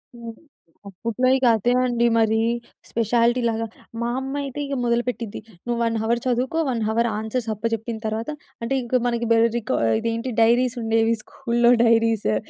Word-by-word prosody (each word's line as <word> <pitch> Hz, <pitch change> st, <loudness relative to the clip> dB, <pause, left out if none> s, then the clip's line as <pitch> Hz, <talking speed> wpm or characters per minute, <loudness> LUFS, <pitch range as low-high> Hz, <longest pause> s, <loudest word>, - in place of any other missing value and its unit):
హ్మ్. 230 Hz, -1 st, -8 dB, 0.5 s
అప్పట్లో 230 Hz, +6 st, -2 dB
ఇక 260 Hz, -, 0 dB
అదే 230 Hz, +3 st, +1 dB
అండి 240 Hz, -1 st, +1 dB
మరి 220 Hz, 0 st, +3 dB, 0.5 s
స్పెషాలిటీ‌ 235 Hz, +2 st, +2 dB
లాగా. 225 Hz, 0 st, -2 dB, 0.4 s
మా 235 Hz, -, -1 dB
అమ్మైతే 275 Hz, +1 st, -4 dB
ఇక 275 Hz, 0 st, -3 dB
మొదలుపెట్టింది 235 Hz, -2 st, -1 dB, 0.3 s
"నువ్వు 240 Hz, -1 st, -1 dB
1 230 Hz, 0 st, 0 dB
అవర్ 235 Hz, +1 st, +1 dB
చదువుకో, 255 Hz, +6 st, 0 dB
1 235 Hz, -3 st, -1 dB
అవర్ 235 Hz, +1 st, +1 dB
ఆన్సర్స్ 225 Hz, +1 st, -3 dB
అప్పజెప్పిన 225 Hz, +1 st, -3 dB
తర్వాత" 220 Hz, +4 st, -2 dB, 0.3 s
అంటే 230 Hz, +4 st, -2 dB
ఇంక 245 Hz, 0 st, 0 dB
మనకి 235 Hz, 0 st, -1 dB
బెల్ 230 Hz, 0 st, +5 dB
రికా 230 Hz, -2 st, -1 dB, 0.2 s
ఇదేంటి 230 Hz, +2 st, -2 dB
డైరీసుండేవి 230 Hz, -1 st, +2 dB
స్కూల్లో 240 Hz, -2 st, +1 dB
డైరీసు. 225 Hz, -, +3 dB
235 Hz, 145 wpm, -23 LUFS, 225-245 Hz, 0.5 s, బెల్